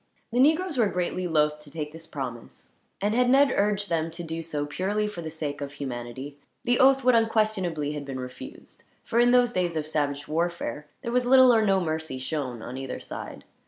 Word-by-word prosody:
The 245 - 0
negroes 310 +2 +3
were 225 - +4
greatly 180 0 -2
loath 150 -2 +1
to 150 - -15
take 150 0 -5
this 165 0 -11
promise, 130 -6 -7 0.3
and 205 +2 +1
had 250 +1 +3
Ned 275 +1 +5
urged 205 0 +1
them 165 -2 0
to 170 +1 -7
do 165 0 -4
so 150 -3 -3
purely 200 +8 -1
for 210 -5 -6
the 160 - -5
sake 150 -2 -5
of 140 0 -5
humanity, 130 +1 -6 0.2
the 245 -1 +2
oath 270 0 +5
would 255 0 +5
unquestionably 215 -9 +1
have 150 -1 -5
been 135 -1 -5
refused; 125 0 -10 0.2
for 235 - 0
in 240 0 +5
those 245 -1 +4
days 175 -2 0
of 155 -1 -1
savage 145 -2 -2
warfare, 160 -4 -2 0.2
there 235 - -3
was 250 0 +1
little 260 -1 +7
or 220 -1 +4
no 195 -2 +3
mercy 160 -5 -3
shown 130 -3 -4
on 125 +2 -6
either 135 -1 -5
side. - - -8
165 Hz, 205 wpm, -26 LUFS, 145-220 Hz, 0.3 s, little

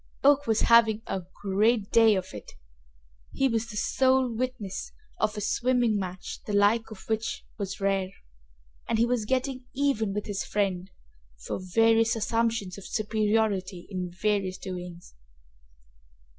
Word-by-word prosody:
Oak 285 0 +5
was 225 -1 +2
having 225 -2 +5
a 190 - -3 0.2
great 205 +2 +2
day 225 -2 +6
of 190 0 -4
it! 105 - -9 0.8
He 270 - +2
was 230 -2 -1
the 210 - -6
sole 260 +1 +2
witness 235 -5 -4 0.3
of 215 0 0
a - - -3
swimming 240 +1 +1
match 185 -1 -6
the 210 - -3
like 205 +3 +3
of 215 -3 -12
which 220 0 -2
was 195 -1 -4
rare, 195 -1 0 0.8
and 225 - +2
he 230 - +4
was 240 -3 0
getting 260 +1 -1
even 260 -7 +1
with 210 +1 -3
his 205 -1 -3
friend 190 -3 -1 0.6
for - - -3
various 225 +4 +3
assumptions 225 -3 -1
of 200 - -10
superiority 210 -4 0
in 180 -2 -3
various 190 0 -1
doings. 180 -2 -8
215 Hz, 145 wpm, -27 LUFS, 195-230 Hz, 0.8 s, day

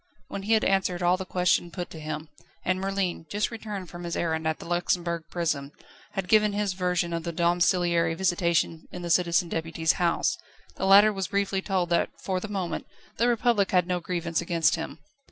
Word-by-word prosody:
When 200 - -5
he 210 +3 +1
had 220 - +3
answered 190 -2 +1
all 175 +1 +4
the 185 0 -6
questions 180 -1 +1
put 180 -2 -5
to 160 - -8
him, 155 0 -5 0.4
and 185 +1 +1
Merlin 195 -4 -2
just 205 +5 -1
returned 210 -5 -6
from 175 0 -8
his 170 0 -3
errand 160 -1 -1
at 160 - 0
the - - -10
Luxembourg 175 -1 -1
Prison 155 -5 -2 0.4
had 195 -3 -3
given 210 0 +4
his 205 -2 0
version 180 -2 0
of 165 - -1
the 170 +1 -4
domiciliary 170 -1 +2
visitation 170 -2 0
in 180 - -7
the 170 - -2
Citizen 170 0 +3
Deputy's 165 0 0
house, 170 -1 +1 0.4
the 190 - -1
latter 205 +2 +7
was 195 -2 -2
briefly 200 0 0
told 185 -3 -1
that 170 - +2
for 185 -1 -2
the 215 - -6
moment 195 -4 -3 0.3
the 235 - +3
Republic 235 -4 +2
had 180 -2 +3
no 180 0 -1
grievance 170 -1 -2
against 170 -1 +2
him. 160 -3 -4
175 Hz, 195 wpm, -27 LUFS, 170-195 Hz, 0.4 s, latter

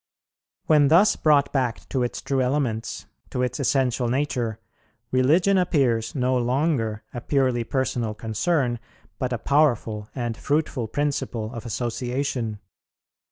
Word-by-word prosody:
"When 150 -2 +5
thus 175 +8 +5
brought 145 -2 +3
back 125 -5 -1
to 130 - 0
its 120 - -3
true 135 -1 0
elements, 125 -4 -1 0.2
to 125 - -1
its 125 - -2
essential 130 -3 +1
nature, 125 -4 -1 0.5
religion 165 +10 +4
appears 130 -11 +1
no 130 -1 +1
longer 125 -3 0
a 120 - -5
purely 130 -3 +1
personal 120 -3 -1
concern, 120 - 0 0.4
but 130 -1 -1
a 120 - 0
powerful 115 -7 +1
and 120 -3 -2
fruitful 145 -5 -1
principle 130 -4 -2
of 115 0 -7
association. 120 -1 -2
125 Hz, 125 wpm, -24 LUFS, 115-145 Hz, 0.5 s, When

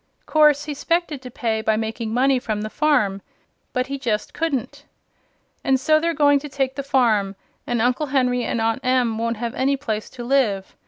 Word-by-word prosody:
Course 300 -2 +4
he 295 - -4
'spected 325 -1 -1
to 255 - -8
pay 225 -2 -2
by 220 0 +1
making 220 0 -3
money 260 +2 +3
from 215 -4 -3
the 215 - -5
farm; 250 -11 +1 0.5
but 255 -1 0
he 275 +1 -5
just 220 -5 -2
couldn't. 290 -8 -3 0.8
An' 265 0 +3
so 310 +4 +3
they're 335 +1 -1
going 285 -1 +4
to 295 +1 -8
take 270 -1 -1
the 280 - -4
farm, 230 -8 +1 0.3
and 240 -1 0
Uncle 250 +5 +1
Henry 250 -2 +1
and 235 - -2
Aunt 225 +3 0
Em 250 -3 +1
won't 230 0 -1
have 235 +1 -3
any 275 +1 +1
place 220 -6 -4
to 245 - -9
live. 235 -7 0
255 Hz, 195 wpm, -22 LUFS, 225-280 Hz, 0.8 s, Course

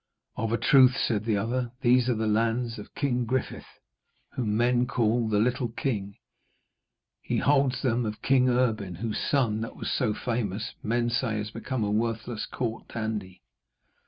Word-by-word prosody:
'Of 115 0 -2
a 115 - +2
truth,' 130 0 +5
said 110 -3 0
the 110 -3 +1
other, 120 +3 -2
'these 125 0 +4
are 120 - +2
the 110 0 -1
lands 115 +2 0
of 105 - -11
King 125 -4 0
Griffith, 130 +2 -2 0.6
whom 110 -4 -1
men 120 +1 +2
call 115 -1 +1
the 105 - +2
Little 125 +3 +1
King. 105 -5 -3 1.1
He - - -2
holds 135 -2 +2
them 120 -2 +1
of 105 0 -5
King 130 -1 +4
Erbin, 110 -7 0
whose 110 +4 -3
son, 115 -6 +1
that 115 - -5
was - - -4
so 105 - 0
famous, 110 -3 -3
men 120 +2 0
say 120 -2 0
has 105 0 -4
become 130 -2 -3
a 105 - 0
worthless 115 +1 -2
court 115 -2 -4
dandy.' 110 -5 -5
115 Hz, 165 wpm, -27 LUFS, 110-125 Hz, 1.1 s, truth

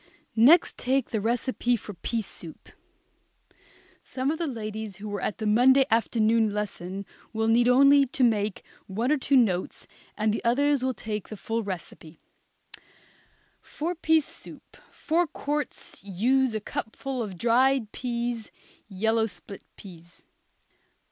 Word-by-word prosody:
Next 275 +10 +5
take 265 0 0
the 220 - -1
recipe 240 +2 0
for 210 -2 -8
pea 225 +5 -3
soup. 165 -4 -10 1.3
Some 265 +2 -2
of 320 - -4
the 335 - -1
ladies 215 -4 -5
who 205 +3 -8
were 205 -2 -4
at - - -2
the 220 - -4
Monday 255 +5 +5
afternoon 225 -1 +2
lesson 200 -2 -4 0.3
will 220 0 0
need 235 +2 +4
only 275 +2 +6
to 260 +1 -1
make 210 -4 +1 0.2
one 225 +8 -1
or 305 - +3
two 275 +1 +1
notes, 190 -7 0 0.3
and 215 0 +1
the - - -3
others 280 +3 +2
will 260 -1 0
take 215 -2 -5
the 215 - -7
full 225 +3 -2
recipe. 170 -5 -8 1.4
For 330 +4 -4
pea 320 -2 +3
soup, - - -9
four 345 +1 0
quarts, 295 -6 -4
use 235 +6 +1
a - - 0
cupful 250 +5 -5
of 200 -5 -5
dried 240 +1 +2
peas, 235 -2 -3 0.4
yellow 220 +3 +1
split 200 -1 -9
peas. 170 -3 -15
230 Hz, 140 wpm, -26 LUFS, 210-265 Hz, 1.4 s, only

